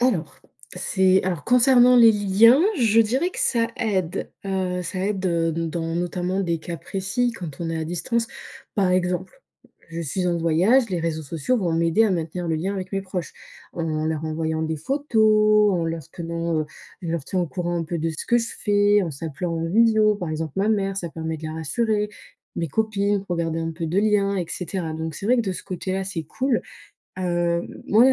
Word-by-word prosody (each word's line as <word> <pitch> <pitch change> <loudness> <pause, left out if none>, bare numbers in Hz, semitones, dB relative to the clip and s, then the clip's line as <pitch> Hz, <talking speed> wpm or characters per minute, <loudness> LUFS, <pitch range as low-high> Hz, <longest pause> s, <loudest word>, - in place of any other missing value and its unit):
Alors, 200 -11 0 0.3
c'est 190 +1 +2
alors 175 -6 -2
concernant 250 0 +6
les 230 -2 +8
liens, 210 +6 +5 0.2
je 230 -2 +4
dirais 260 +11 +1
que - - -9
ça 230 -2 +1
aide, 190 -6 -1
heu, 185 -2 -1
ça 185 +2 -4
aide, 195 -2 -2
heu, 165 -1 +1
donc 165 0 -2
dans, 165 0 -3
notamment, 180 +2 -1
des 170 -3 -1
cas 170 +1 -6
précis 195 - -1
quand 170 -9 -8
on 165 - -2
est 165 - -2
à 160 - -2
distance. 225 +8 -1 0.5
Par 190 -3 +2
exemple, 180 - -1 0.5
je 165 - -5
suis 180 +4 -2
en 175 - +1
voyage, 185 +10 +3
les 175 - -1
réseaux 160 -1 -2
sociaux 165 - -1
vont 175 -4 0
m'aider 165 +6 +3
à 215 - +2
maintenir 170 0 -2
le 165 - +1
lien 190 +5 -2
avec 185 -1 -5
mes 195 - -1
proches 185 -2 -5 0.4
en 155 -2 -2
leur 160 0 -2
envoyant 160 0 -2
des 160 0 -2
photos, 215 - +3
en 170 -2 0
leur 165 -3 -4
tenant, 170 -1 -2
heu, 155 - -3 0.4
je 170 - -4
leur 165 -4 -2
tiens 185 - -1
au 175 - 0
courant 175 +1 -3
un 165 - -2
peu 170 +1 -3
de 165 +1 -1
ce 160 - -6
que 240 - +4
je 230 0 -2
fais, 205 0 +3
en 170 - -2
s'appelant 165 +4 -4
en 165 0 -2
visio. 220 +1 +4
Par 175 -5 -4
exemple, 155 -2 -4
ma 200 +3 +1
mère, 195 -2 0
ça 175 -3 -4
permet 160 0 -4
de 160 - -10
la 155 - -5
rassurer, 210 +7 0 0.5
mes 165 -2 -2
copines 205 +1 0
pour 175 -3 -3
garder 165 -1 -1
un 165 0 -3
peu 165 0 -4
de 175 +5 0
lien 200 -1 +2
et 180 - -1
cetera 180 -2 -4
donc 160 -1 -4
c'est - - -8
vrai 250 +3 +4
que, 235 - +2
de 195 -4 -2
ce - - -7
côté-là, 190 +1 -3
c'est 185 -4 -4
cool. 255 - -1 0.6
Heu, 175 -1 0 0.2
moi, 225 +4 +5
les 265 - +6
180 Hz, 215 wpm, -23 LUFS, 165-210 Hz, 0.6 s, les